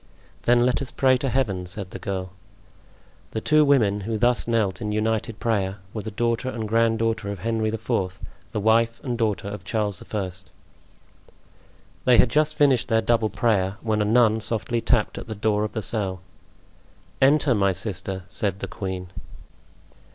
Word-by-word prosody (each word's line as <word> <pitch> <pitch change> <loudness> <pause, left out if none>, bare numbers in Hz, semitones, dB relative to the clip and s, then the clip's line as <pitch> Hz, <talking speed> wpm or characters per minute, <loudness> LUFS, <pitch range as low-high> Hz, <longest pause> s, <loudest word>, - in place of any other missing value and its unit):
"Then 120 0 +4
let 125 +3 +1
us 140 - -4
pray 130 -1 +3
to 135 +1 -2
Heaven," 100 -9 -1
said 90 0 -4
the - - -7
girl. 95 0 -4 1.0
The 110 - -1
two 155 +6 +4
women 110 -8 +3
who 110 +2 -2
thus 120 +2 +2
knelt 110 -4 0
in 105 -1 -2
united 110 +1 -1
prayer 100 -4 0 0.2
were 110 - -4
the 110 - -5
daughter 115 +3 -1
and 115 -4 -4
grand 115 +1 +2
daughter 115 -2 -1
of 100 - -4
Henry 110 +3 -1
IV., 95 -4 -2 0.3
the - - -2
wife 115 +2 +2
and 125 -4 -2
daughter 110 -4 -1
of 105 0 -6
Charles 105 -4 -2
I. 100 -4 -2 1.7
They 125 -2 +6
had 120 - +5
just 155 +2 +2
finished 135 -5 +3
their 110 -1 +2
double 115 -1 +2
prayer, 100 -5 0
when 110 -2 0
a - - +2
nun 110 0 +4
softly 115 +1 -1
tapped 115 -3 +1
at - - -9
the 110 - -5
door 105 0 +1
of 105 - -3
the 110 - -3
cell. 95 -5 -2 1.0
"Enter, 140 0 +4
my 100 -3 +2
sister," 95 0 -3
said 100 -2 -2
the 100 - -4
queen. 95 -1 -5
110 Hz, 175 wpm, -24 LUFS, 100-120 Hz, 1.7 s, They